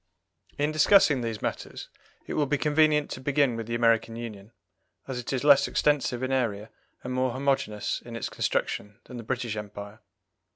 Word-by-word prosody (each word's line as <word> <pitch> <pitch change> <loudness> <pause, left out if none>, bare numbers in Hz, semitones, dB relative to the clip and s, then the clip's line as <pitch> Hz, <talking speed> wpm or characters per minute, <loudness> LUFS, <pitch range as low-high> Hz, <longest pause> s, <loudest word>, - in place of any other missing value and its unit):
In 145 +1 +1
discussing 155 -3 +5
these 115 -2 -4
matters - - -4 0.4
it - - -5
will 150 -2 +1
be 145 +1 +1
convenient 150 0 +2
to 130 - -6
begin 140 -2 +2
with 115 -1 -5
the 115 - -2
American 115 -1 +2
Union, 110 -3 -8 0.6
as 130 -2 -4
it 120 - -5
is 130 -1 -1
less 140 -1 +6
extensive 140 -4 +1
in 130 - -1
area 110 -5 -1 0.3
and 125 - -4
more 130 -1 0
homogeneous 130 -6 -1
in 120 -1 -9
its 115 - -3
construction 105 0 -2
than 125 - -10
the 115 - -7
British 120 -1 -3
Empire. 105 0 -8
125 Hz, 175 wpm, -27 LUFS, 115-140 Hz, 0.6 s, less